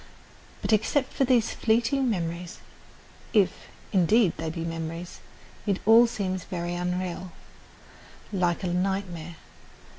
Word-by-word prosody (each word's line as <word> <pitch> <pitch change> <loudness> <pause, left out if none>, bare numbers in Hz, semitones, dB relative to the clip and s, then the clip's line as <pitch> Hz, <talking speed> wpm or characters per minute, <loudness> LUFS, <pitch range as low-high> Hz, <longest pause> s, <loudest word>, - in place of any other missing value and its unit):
But, - - +1
except 255 +6 +1
for 270 - +2
these 240 -3 +3
fleeting 240 +4 +1
memories, 170 -3 -3 0.8
if, 200 -4 +2 0.3
indeed, 195 +1 +4
they 160 0 -3
be 165 +1 -4
memories, 165 +1 -5 0.5
it 200 -2 +2
all 230 +3 +8
seems 190 -5 -3
very 175 -1 -4
unreal, 180 0 -3 1.0
like 180 -1 +1
a - - 0
nightmare. 180 -3 -2
185 Hz, 115 wpm, -27 LUFS, 175-220 Hz, 1.0 s, all